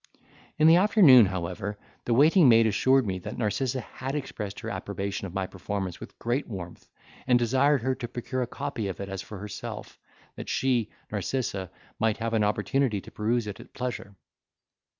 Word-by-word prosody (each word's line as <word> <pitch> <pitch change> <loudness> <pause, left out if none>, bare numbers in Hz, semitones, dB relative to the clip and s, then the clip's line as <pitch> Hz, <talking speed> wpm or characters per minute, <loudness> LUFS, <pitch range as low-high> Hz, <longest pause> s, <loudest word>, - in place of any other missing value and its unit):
In 155 - +4
the 165 +2 +8
afternoon, 175 - +7
however, 95 +2 -4 0.3
the 120 - +1
waiting 155 +3 +6
maid 115 -1 +6
assured 130 +5 +3
me 95 -2 -2
that - - -7
Narcissa 125 +4 -1
had 130 +4 -6
expressed 105 -8 -5
her - - -5
approbation 100 0 -4
of 90 - -11
my 95 -1 0
performance 95 -1 -5
with - - -11
great 120 +5 -1
warmth, 90 -6 -8 0.4
and 125 -2 +5
desired 130 +3 +2
her 130 +1 +1
to 125 -2 -5
procure 125 +2 -4
a 125 - -1
copy 135 -5 -4
of 95 - -5
it 100 0 -5
as 95 -1 -4
for 105 - -9
herself, 100 +1 -7 0.4
that - - -7
she 125 -5 +1 0.2
(Narcissa) 100 -2 -2 0.3
might 110 -1 +1
have 115 0 -3
an 110 -2 +2
opportunity 105 +2 +1
to - - -13
peruse 115 +2 0
it 105 -2 -6
at - - -14
pleasure. 125 -5 -5
115 Hz, 180 wpm, -27 LUFS, 100-130 Hz, 0.4 s, the